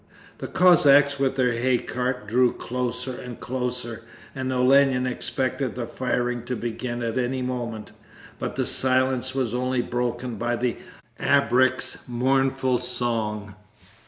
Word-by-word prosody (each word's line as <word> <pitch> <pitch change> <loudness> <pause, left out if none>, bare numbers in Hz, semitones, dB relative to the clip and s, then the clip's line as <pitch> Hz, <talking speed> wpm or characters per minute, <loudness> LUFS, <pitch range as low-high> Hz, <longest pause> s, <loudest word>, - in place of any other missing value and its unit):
The - - -5
Cossacks 145 -6 +5
with 135 -1 +1
their 125 -2 +2
hay 125 +2 +2
cart 125 -1 -3
drew 125 +3 +3
closer 125 +1 -3
and 125 -2 -8
closer, 125 -2 -3 0.3
and 130 -1 -3
Olenin 130 0 +4
expected 130 +1 -2
the 125 -1 -3
firing 125 -1 -2
to 125 - -2
begin 120 +1 -4
at 115 +2 -1
any 130 +1 -1
moment, 120 -4 -4 0.5
but - - -4
the - - 0
silence 130 0 +1
was 125 -4 -1
only 125 0 0
broken 120 -1 -3
by 120 +2 -1
the 120 0 -1 0.4
abreks' 130 +1 +2
mournful 130 +1 +1
song. 110 -5 -2
125 Hz, 130 wpm, -24 LUFS, 120-130 Hz, 0.5 s, Cossacks